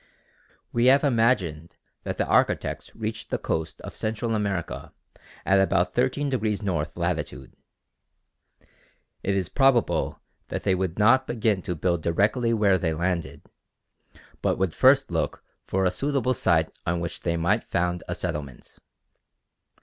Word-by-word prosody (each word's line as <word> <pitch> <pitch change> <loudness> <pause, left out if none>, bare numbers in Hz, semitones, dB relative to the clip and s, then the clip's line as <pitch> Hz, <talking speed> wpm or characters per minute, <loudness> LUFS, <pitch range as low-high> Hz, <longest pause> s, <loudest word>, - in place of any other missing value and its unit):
We 120 +1 +2
have 135 +3 +6
imagined 115 - +1 0.3
that - - -3
the - - +1
architects - - 0
reached 110 0 -5
the - - 0
coast 80 -1 -3
of - - -9
Central 110 +1 -2
America 100 -5 -3 0.5
at 95 0 +4
about 90 -1 +1
13° 125 -5 0
north 85 -6 -2
latitude. 85 -7 -3 1.7
It 100 - 0
is 95 -3 0
probable 135 +1 +2 0.3
that - - -4
they 95 - +2
would 90 -2 -2
not 130 +5 +4
begin 110 -4 0
to 90 - -3
build 85 +1 0
directly 105 +9 +1
they 95 -7 +2
landed, 85 0 -2 1.0
but - - +1
would 95 -4 0
first - - +4
look - - -2 0.2
for 95 0 0
a 90 - +3
suitable 135 +4 0
site 80 -8 +2 0.2
on 85 +1 +1
which 85 0 -4
they 85 -1 -1
might 95 +7 +1
found 90 0 -1
a - - -3
settlement. 70 -4 -6
95 Hz, 135 wpm, -25 LUFS, 85-115 Hz, 1.7 s, have